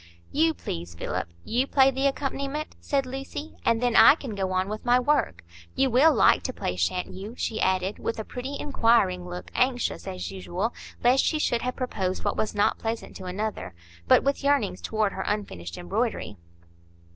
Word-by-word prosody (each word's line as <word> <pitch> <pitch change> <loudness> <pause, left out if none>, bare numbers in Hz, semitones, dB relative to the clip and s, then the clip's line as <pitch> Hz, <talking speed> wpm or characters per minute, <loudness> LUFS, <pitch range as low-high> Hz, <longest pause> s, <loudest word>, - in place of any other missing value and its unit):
"You, 320 +1 +2
please, 85 0 -6
Philip,—you 85 - -2
play 270 -1 +5
the 270 +1 +1
accompaniment," 275 +2 -3
said 275 -2 0
Lucy, 270 +4 -7
"and 230 +1 +2
then 245 -2 +2
I - - +9
can 265 -8 -7
go 190 -2 -2
on 185 0 0
with 215 +1 -5
my 245 +1 +4
work. 250 - +1 0.3
You 265 -1 +2
will 275 +7 +6
like - - +4
to 255 - -2
play, 90 - -3
sha'n't 90 - -1
you?" 205 +5 -8
she 220 - -2
added, 185 +1 +1
with 230 - -3
a 220 - -3
pretty, 265 +3 -5
inquiring 215 -10 +2
look, 180 0 -7
anxious, 250 -5 0
as 185 -1 -5
usual, 190 +3 -3 0.3
lest 250 +2 +5
she 310 - +1
should 240 -6 +1
have 250 0 -2
proposed 195 -8 -2
what - - 0
was 215 - -2
not 205 - +2
pleasant 225 0 -4
to 190 - -9
another; 195 - -4 0.3
but - - +6
with 280 +1 0
yearnings 280 -10 +1
toward 215 -2 0
her 190 - -4
unfinished 90 - -3
embroidery. 90 +3 -2
225 Hz, 180 wpm, -26 LUFS, 185-270 Hz, 0.3 s, I